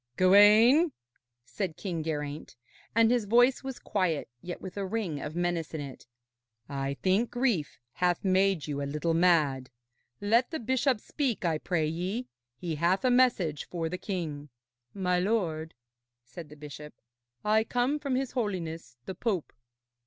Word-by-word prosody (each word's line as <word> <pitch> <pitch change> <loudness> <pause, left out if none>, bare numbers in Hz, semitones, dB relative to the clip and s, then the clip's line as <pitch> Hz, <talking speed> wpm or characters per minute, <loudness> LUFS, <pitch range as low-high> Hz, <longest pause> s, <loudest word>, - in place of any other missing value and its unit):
'Gawaine,' 215 - +6 0.5
said 185 -1 -4
King 175 -5 -3
Geraint, 150 -1 -4 0.4
and 230 0 +5
his 245 -3 +2
voice 245 +6 +4
was 265 -1 -5
quiet, 180 -7 -1
yet 175 0 -6
with 185 - -8
a 200 - -2
ring 190 -7 -2
of 155 - -6
menace 175 -2 -1
in - - -3
it, 135 -4 -8 0.6
'I 140 0 -3
think 195 +5 +2
grief 235 - 0 0.2
hath 180 +1 0
made 190 -3 +2
you 145 -2 -3
a 140 - -3
little 150 +3 -1
mad. 155 -7 +3 0.5
Let 230 +5 +2
the 320 - -4
bishop 260 +1 +1
speak, 245 - -2
I 160 -2 +1
pray 160 -2 0
ye. 180 +10 -2 0.3
He 170 +2 -4
hath 180 - +1
a 255 - +4
message 230 - +2
for 165 -2 -2
the 180 +2 -4
king.' 155 -7 -4 0.5
'My 180 -2 +1
lord,' 175 -6 -1 0.5
said 165 +3 -10
the 150 - -12
bishop, 150 -1 -10 0.5
'I 215 +1 +3
come 250 +6 0
from 280 -3 -1
his 265 -1 -1
Holiness 170 - -4
the 190 - -5
Pope.' 190 -3 -2
180 Hz, 155 wpm, -29 LUFS, 160-225 Hz, 0.6 s, Gawaine